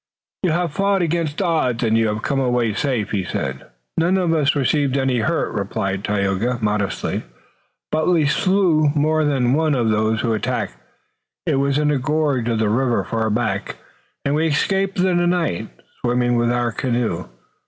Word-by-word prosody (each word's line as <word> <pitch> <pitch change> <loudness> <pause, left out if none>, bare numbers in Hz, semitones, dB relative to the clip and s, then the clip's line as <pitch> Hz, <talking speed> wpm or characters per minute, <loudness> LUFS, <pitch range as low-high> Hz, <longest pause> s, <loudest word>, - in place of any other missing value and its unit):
"You 185 - +1
have 170 -1 0
fought 195 0 +1
against 165 +1 -1
odds 130 -9 0
and 110 -1 +2
you 115 0 +3
have 105 +1 -3
come 140 -1 0
away 125 -4 +1
safe," 120 -3 -1
he 100 -3 0
said. 65 -6 -4 0.3
"None 175 +3 +2
of 175 -3 +1
us 150 -3 +2
received 140 0 +1
any 130 -2 +1
hurt," 155 +9 0
replied 100 -1 -2
Tayoga, 105 +4 0
modestly, 105 -3 -1 0.7
"but 155 0 0
we 165 -4 +3
slew 170 -1 +3
more 155 +1 +2
than 130 -4 +1
one 155 0 +2
of 115 -3 +1
those 110 +1 +1
who 115 -2 0
attacked. 105 - -2 0.7
It - - +1
was 140 0 +1
in 150 0 +2
a 145 - +1
gorge 140 -3 0
of 115 - 0
the 110 -1 +1
river 120 +3 +1
far 110 -1 -1
back, 110 +2 -1 0.5
and 140 - +1
we 160 +2 +2
escaped 195 +6 0
in 180 -1 +2
the 175 0 +2
night, 175 - -1 0.3
swimming 120 0 +1
with 120 0 +2
our 120 -1 0
canoe. 120 -8 -1
130 Hz, 175 wpm, -20 LUFS, 115-155 Hz, 0.7 s, you